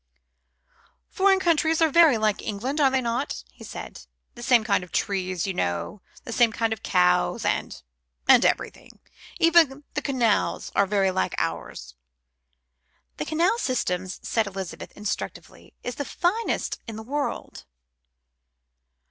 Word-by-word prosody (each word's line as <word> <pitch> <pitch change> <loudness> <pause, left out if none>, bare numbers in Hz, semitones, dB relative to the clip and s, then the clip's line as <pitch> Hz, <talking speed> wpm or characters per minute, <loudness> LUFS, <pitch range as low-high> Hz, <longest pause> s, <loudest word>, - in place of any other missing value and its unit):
"Foreign 385 0 +3
countries 325 -2 +2
are 325 -1 +4
very 320 -6 +6
like 215 -2 0
England, 255 +9 -3
are 275 - +6
they 265 0 +1
not?" 240 +3 -2
he - - -15
said. - - -9 0.3
"The 240 - -12
same 240 -1 +4
kind 200 -3 +1
of 180 - -12
trees, 185 -3 -1
you 195 - -2
know, 85 - -3
and - - -19
the - - -6
same 235 -1 +4
kind 225 0 0
of 220 - -9
cows, 180 -1 +2
and - - -1 0.5
and - - +7
everything. - - -2 0.4
Even 325 -4 +4
the 295 - -1
canals 250 -7 0
are 200 - +3
very 195 -1 +2
like 95 - -1
ours." - - -4 1.2
"The 150 - -3
canal 345 +9 +1
system," 185 - -1
said 215 +4 -2
Elizabeth 190 -2 -7
instructively, 210 0 -6
"is 245 - -3
the 285 - -4
finest 390 - -1
in 225 - -6
the 220 - -7
world." 285 +5 -4
230 Hz, 145 wpm, -25 LUFS, 195-295 Hz, 1.2 s, and